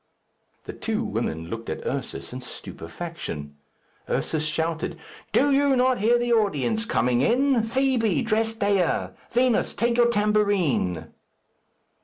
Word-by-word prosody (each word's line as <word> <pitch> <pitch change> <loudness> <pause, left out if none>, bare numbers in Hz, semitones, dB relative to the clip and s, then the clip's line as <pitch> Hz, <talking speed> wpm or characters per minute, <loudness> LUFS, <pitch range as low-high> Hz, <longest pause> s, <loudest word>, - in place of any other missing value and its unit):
The - - -7
two 225 +1 -2
women 85 - -3
looked 115 0 -5
at - - -5
Ursus 135 -2 -4
in 130 - -6
stupefaction. 80 - -7 0.5
Ursus 155 -1 -1
shouted, 160 +1 -2 0.3
"Do 285 +1 +3
you 280 0 +4
not 255 0 +2
hear 230 +4 +4
the 240 0 +1
audience 220 - +1
coming 125 - +1
in? 255 - +3
Fibi, 250 -1 +1
dress 225 0 +1
Dea. 200 -5 +1 0.2
Vinos, 245 -1 +2
take 235 +1 +1
your 240 0 +5
tambourine." 200 - +1
210 Hz, 125 wpm, -25 LUFS, 145-235 Hz, 0.5 s, your